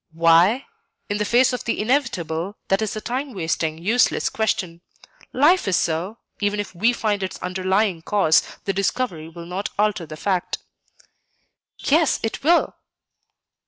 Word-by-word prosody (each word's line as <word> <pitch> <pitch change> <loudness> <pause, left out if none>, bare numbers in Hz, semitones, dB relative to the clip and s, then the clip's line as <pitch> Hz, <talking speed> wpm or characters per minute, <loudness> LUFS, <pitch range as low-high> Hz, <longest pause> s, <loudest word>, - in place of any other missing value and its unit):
"Why? 170 +9 +4 0.4
In 205 0 -1
the 210 - 0
face 245 +4 +4
of 250 - -4
the 230 - -1
inevitable, 205 - -1
that 195 +2 +2
is 220 -1 -2
a 215 - -4
time 255 +2 -4
wasting, 160 -2 -1
useless 215 +9 +2
question. 185 -6 -1 0.5
Life 315 - +3
is 190 - +2
so; 175 +7 -1 0.2
even 205 0 0
if 205 - -4
we 210 +7 +2
find 210 -4 -1
its 190 -1 -4
underlying 185 0 0
cause, 165 -3 +3 0.2
the 195 - 0
discovery 190 -4 -2
will 170 +1 -10
not 185 +4 -4
alter 205 -5 0
the 155 - -8
fact." 185 +1 -1 1.2
"Yes, 315 +1 +2
it 225 - -3
will." 340 +3 +3
200 Hz, 150 wpm, -22 LUFS, 170-230 Hz, 1.2 s, Why